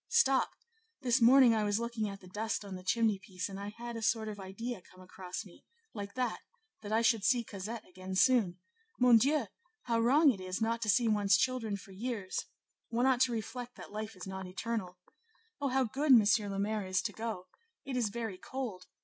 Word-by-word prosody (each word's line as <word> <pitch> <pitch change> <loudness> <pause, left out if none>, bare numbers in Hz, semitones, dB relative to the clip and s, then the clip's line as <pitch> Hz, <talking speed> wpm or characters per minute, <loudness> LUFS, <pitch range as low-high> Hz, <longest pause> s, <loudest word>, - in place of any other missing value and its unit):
Stop! 265 0 +3 0.5
this 250 0 +2
morning 250 0 +7
I 220 -1 +1
was 205 +1 +1
looking 235 -2 -2
at 195 0 -8
the 185 - -13
dust 215 +3 -3
on 200 - -7
the 185 - -6
chimney 220 0 +2
piece, 185 -2 -5
and 195 0 -7
I 200 +1 -5
had 235 +2 -7
a 230 - -5
sort 220 0 +1
of 205 -1 -7
idea 195 +3 -5
come 185 +1 -19
across 185 +2 -7
me, 180 - -16 0.3
like 200 -1 -6
that, 255 -1 -1 0.4
that 210 -1 -7
I 225 +1 +3
should 225 -2 +3
see 245 +1 +3
Cosette 215 +2 -7
again 185 +1 -7
soon. 205 -5 +4 0.4
Mon 245 -2 +7
Dieu! 280 +2 +2 0.4
how 230 -2 +1
wrong 280 +6 +5
it 195 -6 -7
is 185 +1 -4
not 230 +1 0
to 215 - -1
see 235 +2 +4
one's 205 -3 +4
children 225 -3 0
for 195 0 -14
years! 205 -1 -4 0.4
One 235 +2 +1
ought 260 -2 +3
to 260 -2 +4
reflect 240 +2 -5
that - - -11
life 215 +1 -5
is 185 - -8
not 190 -1 -6
eternal. 185 -1 -4 0.6
Oh, 280 - +1
how 265 0 +2
good 275 +5 0
M. 215 -3 +5
le 195 - -3
Maire 210 -1 -1
is 185 -1 +1
to 210 - -3
go! 220 -4 -4 0.4
it 270 -2 -4
is 240 -4 +1
very 220 -3 -5
cold! 240 -9 -5
220 Hz, 210 wpm, -32 LUFS, 195-240 Hz, 0.6 s, morning